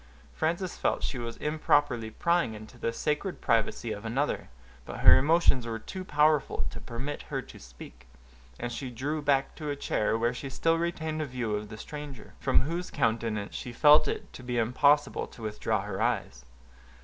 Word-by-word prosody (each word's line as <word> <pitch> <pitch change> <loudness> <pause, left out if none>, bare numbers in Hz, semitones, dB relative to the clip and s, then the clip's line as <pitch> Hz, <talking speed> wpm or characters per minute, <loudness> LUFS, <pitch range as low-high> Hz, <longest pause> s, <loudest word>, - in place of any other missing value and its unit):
Frances 170 +3 -1
felt - - 0
she 130 - -2
was 115 -1 -5
improperly 145 -6 +1
prying 170 -1 +1
into 110 0 -12
the 115 - 0
sacred 150 +10 -2
privacy 115 0 +1
of 105 0 -5
another; 130 +6 -1 0.3
but - - -7
her - - +9
emotions 145 -5 +3
were 115 -1 -2
too 185 +11 -7
powerful 150 -3 +2
to - - -8
permit 130 +5 -5
her - - -1
to - - -13
speak, - - -13 0.5
and 120 - -3
she 130 +1 -4
drew 145 +6 -3
back 140 -1 +2
to 150 -1 -4
a 145 - -1
chair, 110 -5 0
where 120 +2 +1
she 135 +2 -6
still 165 +4 +1
retained 160 -2 -2
a - - -1
view 125 -4 -3
of 105 0 -5
the 110 - -8
stranger, 145 0 -8
from - - +3
whose 170 +6 -3
countenance 110 -5 -1
she 125 - -5
felt 150 +5 +6
it - - -4
to - - -9
be 125 -1 -3
impossible 140 +5 +3
to 115 - -13
withdraw 105 -1 -1
her - - -4
eyes. 60 0 -1
130 Hz, 185 wpm, -29 LUFS, 115-150 Hz, 0.5 s, her